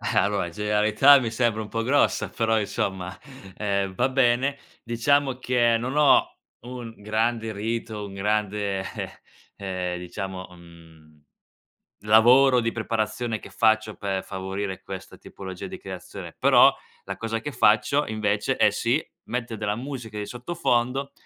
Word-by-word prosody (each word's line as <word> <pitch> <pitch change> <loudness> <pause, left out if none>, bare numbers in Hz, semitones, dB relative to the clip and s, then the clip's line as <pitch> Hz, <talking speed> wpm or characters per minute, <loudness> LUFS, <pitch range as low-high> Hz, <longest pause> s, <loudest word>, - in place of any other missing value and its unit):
Allora, 100 -2 +2
in 85 - -8
genialità 105 +7 +5
mi 120 -3 -2
sembra 115 -1 0
un 110 - -6
po' 115 +1 -2
grossa, 125 -5 +2
però 110 +3 +1
insomma, 95 -3 -3 0.4
eh, 100 -2 -1
va 125 +7 +1
bene. 130 +1 +2 0.2
Diciamo 130 +3 +1
che, 120 -2 +2
non 130 +5 -3
ho 150 -1 +4 0.2
un 120 -1 -8
grande 110 +2 -1
rito, 110 0 -4
un 100 - -9
grande, 105 0 -1
eh, 95 - -6 0.5
ehm, 90 -2 -3
diciamo, 95 +1 -6
mhmm, 80 -3 -17 0.8
lavoro 125 +4 +6
di 115 0 -1
preparazione 110 0 -2
che - - -13
faccio 110 -1 +2
per 95 -2 -3
favorire 95 0 -5
questa - - -9
tipologia 95 -2 -8
di - - -7
creazione. - - -9
Però, - - +6 0.3
la - - -5
cosa 115 0 -3
che 145 +6 -5
faccio, 125 +4 +3
invece, 105 -1 0
è - - +4
sì, - - +1 0.3
metter 120 -2 -4
della 105 0 -1
musica 120 -3 -7
di 105 - -3
sottofondo, 125 0 -1
110 Hz, 140 wpm, -25 LUFS, 100-120 Hz, 0.8 s, lavoro